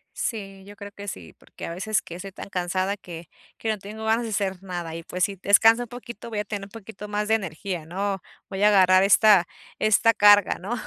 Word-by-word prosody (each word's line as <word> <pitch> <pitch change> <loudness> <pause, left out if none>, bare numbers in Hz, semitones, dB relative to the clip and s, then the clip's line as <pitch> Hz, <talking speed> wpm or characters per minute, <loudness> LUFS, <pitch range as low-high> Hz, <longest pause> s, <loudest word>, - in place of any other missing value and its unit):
Sí, 195 -4 -5
yo 205 +1 -12
creo 200 0 -10
que 200 0 -10
sí, 85 - -8
porque - - -11
a 170 - -5
veces 210 +4 -1
que 170 - -10
estoy 195 +2 -8
tan 195 - -10
cansada 185 +2 -1
que 170 -3 -10 0.3
que 225 - -4
no 215 - 0
tengo 210 +2 -9
ganas 225 +2 +2
de 230 - -4
hacer 190 -3 -2
nada 175 -3 -5
y, 165 - -7
pues, 180 +2 -3
si 200 - 0
descanso 225 +5 +5
un 240 - -9
poquito, 235 -2 -9
voy 215 -2 -3
a - - -1
tener 205 -1 -5
un - - -15
poquito 210 -1 -10
más 210 0 -2
de 220 - +3
energía, 180 -3 -5
¿no? 195 +2 -3 0.3
Voy 195 0 -3
a - - +7
agarrar 185 -2 +5
esta 200 -2 +5 0.3
esta 220 +2 +3
carga, 205 -2 +6
¿no?, 200 +6 -5
200 Hz, 230 wpm, -24 LUFS, 185-215 Hz, 0.3 s, a